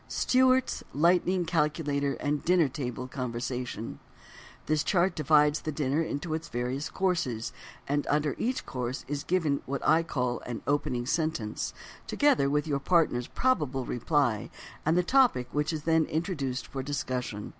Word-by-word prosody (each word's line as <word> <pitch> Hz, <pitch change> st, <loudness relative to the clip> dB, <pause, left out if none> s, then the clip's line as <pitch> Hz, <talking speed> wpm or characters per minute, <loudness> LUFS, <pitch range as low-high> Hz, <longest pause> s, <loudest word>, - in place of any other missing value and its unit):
STEWART'S 260 Hz, 0 st, +2 dB
LIGHTNING 175 Hz, +3 st, +3 dB
CALCULATOR 150 Hz, -4 st, 0 dB
OF 145 Hz, 0 st, -1 dB
DINNER 175 Hz, -3 st, +4 dB
TABLE 125 Hz, -2 st, -4 dB
CONVERSATION 125 Hz, -2 st, -4 dB, 0.7 s
This 155 Hz, -1 st, +1 dB
chart 180 Hz, -1 st, +2 dB
divides 150 Hz, -1 st, +3 dB
the 155 Hz, -, -3 dB
dinner 145 Hz, +1 st, 0 dB
into 160 Hz, 0 st, -3 dB
its 160 Hz, +1 st, -3 dB
various 125 Hz, +4 st, -2 dB
courses, 165 Hz, -, -1 dB, 0.3 s
and 145 Hz, +1 st, 0 dB
under 150 Hz, -1 st, +1 dB
each 250 Hz, +2 st, -1 dB
course 125 Hz, 0 st, -4 dB
is 145 Hz, 0 st, -3 dB
given 160 Hz, -6 st, +1 dB
what 140 Hz, +1 st, -2 dB
I 160 Hz, +2 st, +5 dB
call 125 Hz, -7 st, -2 dB
an 120 Hz, -2 st, -5 dB
"opening 130 Hz, -4 st, 0 dB
sentence," 155 Hz, -7 st, -2 dB, 0.3 s
together 280 Hz, -, +3 dB
with 150 Hz, +2 st, +1 dB
your 145 Hz, -3 st, 0 dB
partner's 140 Hz, -6 st, +2 dB
probable 150 Hz, -, 0 dB
reply 120 Hz, -3 st, 0 dB, 0.4 s
and 160 Hz, +2 st, +4 dB
the 180 Hz, -, +4 dB
topic 240 Hz, -, +3 dB
which 150 Hz, +2 st, 0 dB
is 155 Hz, -2 st, -4 dB
then 160 Hz, -1 st, +3 dB
introduced 150 Hz, -6 st, -2 dB
for 135 Hz, -, -5 dB
discussion. 130 Hz, -6 st, -3 dB
145 Hz, 145 wpm, -29 LUFS, 130-165 Hz, 0.7 s, I